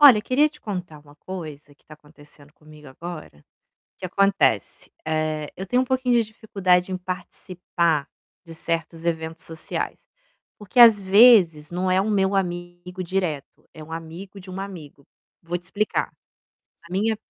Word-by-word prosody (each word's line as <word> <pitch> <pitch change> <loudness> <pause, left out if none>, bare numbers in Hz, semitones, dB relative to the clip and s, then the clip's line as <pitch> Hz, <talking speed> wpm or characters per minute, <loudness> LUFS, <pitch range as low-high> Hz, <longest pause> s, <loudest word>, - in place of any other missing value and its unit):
Olha, 275 -7 +10
eu - - -4
queria 270 +6 +3
te 300 0 -19
contar 180 -7 -6
uma 145 0 -18
coisa 150 -4 -9
que - - -36
tá 155 - -12
acontecendo 150 -1 -18
comigo 150 -1 -15
agora. 155 - -9 0.6
O - - -78
que 185 - -5
acontece? 195 - +1
Eh, 155 -1 -1
eu 190 - -6
tenho 245 +6 +2
um - - -1
pouquinho 255 -1 +1
de 235 - +4
dificuldade 195 -4 0
em 185 - -1
participar 180 -4 -2 0.4
de 165 -2 -10
certos 165 0 -3
eventos 160 -1 -2
sociais. 160 -1 -5 0.5
Porque, 210 +3 -2
às 230 -3 +9
vezes, 190 -7 +6
não 180 +1 -1
é 185 +1 +4
o 205 - -1
meu 195 -1 +2
amigo 175 0 -3
direto; 170 -6 -3
é 155 - -10
um 155 - -13
amigo 165 +5 -8
de 185 0 -13
um 185 +1 -6
amigo. 165 -8 -9 0.4
Vou 175 +1 -3
te 175 - -17
explicar. 205 +5 -1 0.7
A 170 - -13
minha 215 +4 +1
180 Hz, 165 wpm, -23 LUFS, 160-195 Hz, 0.7 s, Olha